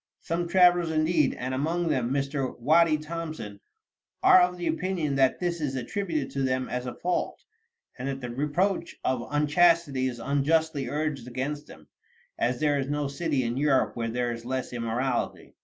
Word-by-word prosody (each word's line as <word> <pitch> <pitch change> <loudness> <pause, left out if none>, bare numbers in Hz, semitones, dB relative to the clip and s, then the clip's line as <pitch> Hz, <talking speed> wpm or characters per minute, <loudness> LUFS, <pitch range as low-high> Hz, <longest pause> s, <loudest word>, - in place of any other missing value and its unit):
Some 170 +1 -2
travelers, 175 -2 +5
indeed, 160 +2 +2
and 130 +1 -4
among 165 +5 0
them 130 -5 0
Mr. 135 0 -2
Waddy 155 +5 +4
Thompson, 155 -9 -6 0.6
are 185 - +8
of 180 0 +1
opinion 170 -2 -1
that 130 -1 +3
this 175 -2 -2
is 140 -3 -2
attributed 155 +3 -2
to 140 - -2
them 130 -1 0
as 125 0 -4
a 125 - -5
fault, 180 0 -2 0.6
and 130 - -3
that 135 -1 -3
the 125 -2 -6
reproach 170 +8 -1
of 125 -2 -1
unchastity 150 -2 +3
is 125 -2 -4
unjustly 145 +1 +1
urged 150 -4 -2
against 140 +4 -4
them, 80 -1 -14 0.5
as 120 +1 0
there 145 -2 +2
is 135 - -2
no 145 -1 -1
city 140 -1 -1
in 120 +1 -2
Europe 140 -2 +2
where 115 -1 -2
there 120 +1 -1
is 115 0 -6
less 130 +1 -3
immorality. 120 +2 -2
145 Hz, 170 wpm, -27 LUFS, 130-165 Hz, 0.6 s, are